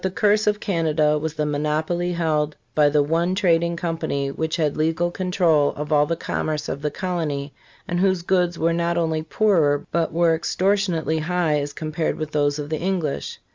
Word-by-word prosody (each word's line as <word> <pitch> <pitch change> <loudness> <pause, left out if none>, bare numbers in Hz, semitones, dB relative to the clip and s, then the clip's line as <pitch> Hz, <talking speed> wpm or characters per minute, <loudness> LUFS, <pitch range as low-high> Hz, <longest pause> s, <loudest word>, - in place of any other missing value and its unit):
But 190 -1 -1
thi - - -6
curse 210 0 +3
of 210 0 +2
Canada 155 -6 +1
was 160 +1 -4
the 150 - -1
monopoly 155 +4 -1
held 155 -3 0 0.2
by 150 +1 +4
the 145 0 +3
one 170 +5 0
trading 170 -3 +2
com 170 -1 -3
pany 140 -2 -2
which 160 0 -1
had 155 -4 0
legal 165 +3 0
control 175 -6 +2
of 150 +1 -3
all 150 0 +4
the 165 - 0
commerce 155 -2 -3
of 140 - -4
the 150 - 0
colony, 150 -4 -3 0.3
and 175 0 -1
whose 185 -2 +2
goods 180 -2 +1
were 165 +1 +1
not 170 0 0
only 160 -2 0
poorer 155 -4 +2
but 170 -1 0
were 165 0 +3
extortionately 170 -2 0
high 160 -2 0
as 145 0 -3
compared 155 +1 -3
with 155 -1 -4
those 145 -1 +1
of 150 0 -6
the 155 - -1
English. 175 -5 -2
160 Hz, 195 wpm, -22 LUFS, 150-175 Hz, 0.3 s, by